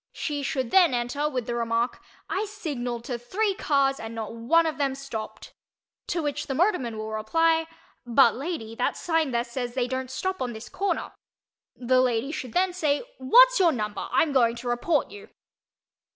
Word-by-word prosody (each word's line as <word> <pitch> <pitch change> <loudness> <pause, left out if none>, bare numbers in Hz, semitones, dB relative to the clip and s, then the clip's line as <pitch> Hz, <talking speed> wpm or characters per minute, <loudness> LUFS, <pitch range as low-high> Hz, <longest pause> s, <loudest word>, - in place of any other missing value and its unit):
She 295 -2 -3
should 260 -3 -2
then 350 -9 +5
enter 265 +5 -1
with 250 -5 -3
the 240 - -3
remark, 235 0 -1 0.3
"I 405 - -1
signalled 275 - -4
to 245 -1 -4
three 390 - 0
cars 275 -7 +1
and 225 +1 -7
not 225 -1 -5
one 250 +9 +3
of 310 -3 -2
them 275 -2 0
stopped," 270 -6 -7 0.5
to 340 -2 -1
which 290 -1 -3
the 270 - -2
motorman 270 - +1
will 215 0 -5
reply, 325 +9 +1 0.4
"But, 240 -1 +5
lady, 270 -6 -5
that 245 - 0
sign 325 -3 0
there 235 -2 0
says 245 0 -5
they 250 -2 0
don't 260 0 -3
stop 375 +8 -3
on 250 -2 -2
this 220 +1 -9
corner." 400 0 -2 0.6
The 255 +1 +2
lady 250 +2 0
should 255 -6 -6
then 365 0 +2
say 305 -3 0 0.2
"What's - - +6
your 350 -3 +5
number—I'm 240 +6 0
going 235 -3 +3
to 240 +1 -7
report 255 +6 0
you." 415 +1 -11
260 Hz, 180 wpm, -26 LUFS, 240-325 Hz, 0.6 s, What's